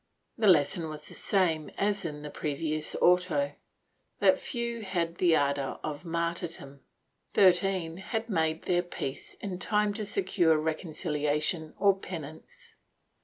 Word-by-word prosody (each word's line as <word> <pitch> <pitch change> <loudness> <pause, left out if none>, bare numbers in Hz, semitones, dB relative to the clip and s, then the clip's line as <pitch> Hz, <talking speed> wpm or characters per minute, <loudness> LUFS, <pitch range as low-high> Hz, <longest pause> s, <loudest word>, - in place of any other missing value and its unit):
The 220 -2 +1
lesson 160 -1 +4
was 150 -1 -7
the - - -5
same 170 -6 +1
as 200 -1 0
in 150 -2 -5
the 150 - -6
previous 155 +1 -3
auto, 175 -6 +3 0.6
that - - +4
few 235 -2 -3
had 175 -4 -2
the 170 -3 +5
ardor 140 -2 0
of 150 +2 -5
martyrdom. 170 -4 -3 0.6
Thirteen 185 -3 +3
had 220 +4 -3
made 160 -5 0
their 175 -1 +2
peace 145 -6 -6
in 190 -3 -4
time 210 +1 +1
to 210 0 -3
secure 180 -5 +2
reconciliation 155 0 -1
or 200 -1 +4
penance. 160 -5 -9
170 Hz, 130 wpm, -29 LUFS, 155-190 Hz, 0.6 s, the